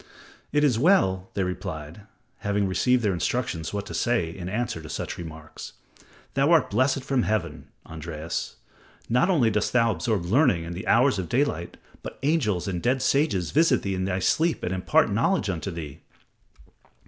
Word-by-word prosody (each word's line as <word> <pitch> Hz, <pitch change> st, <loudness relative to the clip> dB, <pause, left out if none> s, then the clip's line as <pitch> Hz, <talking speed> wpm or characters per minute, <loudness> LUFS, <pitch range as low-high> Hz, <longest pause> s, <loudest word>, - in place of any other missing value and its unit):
"It 145 Hz, +1 st, +2 dB
is 125 Hz, -6 st, +3 dB
well," 95 Hz, -, +3 dB
they 95 Hz, -, +1 dB
replied, 90 Hz, 0 st, -6 dB, 0.3 s
having 100 Hz, -1 st, 0 dB
received 125 Hz, +6 st, +2 dB
their 100 Hz, -3 st, +2 dB
instructions 90 Hz, -3 st, -2 dB
what 100 Hz, 0 st, -3 dB
to -, -, -8 dB
say 100 Hz, -9 st, 0 dB
in 90 Hz, -1 st, -6 dB
answer 110 Hz, -4 st, -2 dB
to 80 Hz, -, -10 dB
such -, -, -4 dB
remarks, 80 Hz, -2 st, -9 dB, 0.6 s
"thou 140 Hz, +2 st, +2 dB
art 165 Hz, -, +3 dB
blessed 130 Hz, +1 st, +1 dB
from 135 Hz, -2 st, +1 dB
Heaven, 105 Hz, -7 st, -2 dB, 0.2 s
Andreas. 80 Hz, 0 st, -5 dB, 0.5 s
Not 125 Hz, +10 st, +3 dB
only 135 Hz, -12 st, +3 dB
dost 105 Hz, 0 st, -1 dB
thou 115 Hz, -2 st, +4 dB
absorb 95 Hz, 0 st, -1 dB
learning 115 Hz, -, +3 dB
in 85 Hz, +1 st, -6 dB
the 95 Hz, +6 st, -7 dB
hours 125 Hz, -2 st, +4 dB
of 90 Hz, -3 st, -4 dB
daylight, 120 Hz, -, -1 dB, 0.2 s
but -, -, -8 dB
angels 125 Hz, -, +1 dB
and 90 Hz, -3 st, -2 dB
dead 130 Hz, +4 st, +1 dB
sages 135 Hz, -, +1 dB
visit 150 Hz, -5 st, +3 dB
thee 100 Hz, -, -1 dB
in 95 Hz, 0 st, -2 dB
they 95 Hz, 0 st, -1 dB
sleep 160 Hz, -, +1 dB
and 90 Hz, -, -1 dB
impart 95 Hz, -, +2 dB
knowledge -, -, +1 dB
unto -, -, -4 dB
thee." 80 Hz, -4 st, -7 dB
100 Hz, 170 wpm, -25 LUFS, 85-130 Hz, 0.6 s, thou